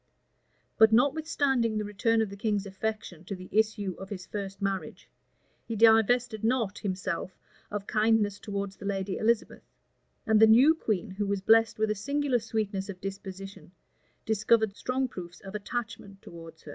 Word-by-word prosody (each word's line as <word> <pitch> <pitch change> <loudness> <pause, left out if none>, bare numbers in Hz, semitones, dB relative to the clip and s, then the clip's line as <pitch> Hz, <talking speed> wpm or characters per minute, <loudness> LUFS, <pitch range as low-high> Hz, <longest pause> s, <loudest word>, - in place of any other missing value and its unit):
But 220 0 +7
notwithstanding 270 -3 +2
the 210 - -1
return 225 +3 +1
of 205 - -6
the - - -7
king's 205 -1 -1
affection 195 -3 -5
to 195 - -5
the 185 0 -11
issue 210 -2 +1
of 195 - -8
his 185 -3 -6
first 195 -2 -6
marriage, 195 -1 -4 0.6
he 230 - -3
divested 225 +1 +4
not 225 -4 0
himself 185 -2 -4 0.3
of 205 -1 -4
kindness 215 -2 +1
towards 200 -2 -5
the 200 - -10
lady 195 -1 -2
Elizabeth; 225 +1 0 0.6
and 220 -1 +4
the 220 - +8
new 250 +8 +7
queen, 215 - -2
who 200 +2 -3
was 200 -1 -1
blessed 225 +3 +4
with 215 0 +1
a - - -1
singular 280 +3 0
sweetness 210 -3 -3
of 185 -2 -7
disposition, 195 -1 -8 0.5
discovered 220 -1 +2
strong 260 +3 -1
proofs 175 -6 -9
of 195 -1 -10
attachment 210 -2 -5
towards 165 -1 -12
her. - - -11
210 Hz, 160 wpm, -28 LUFS, 195-225 Hz, 0.6 s, the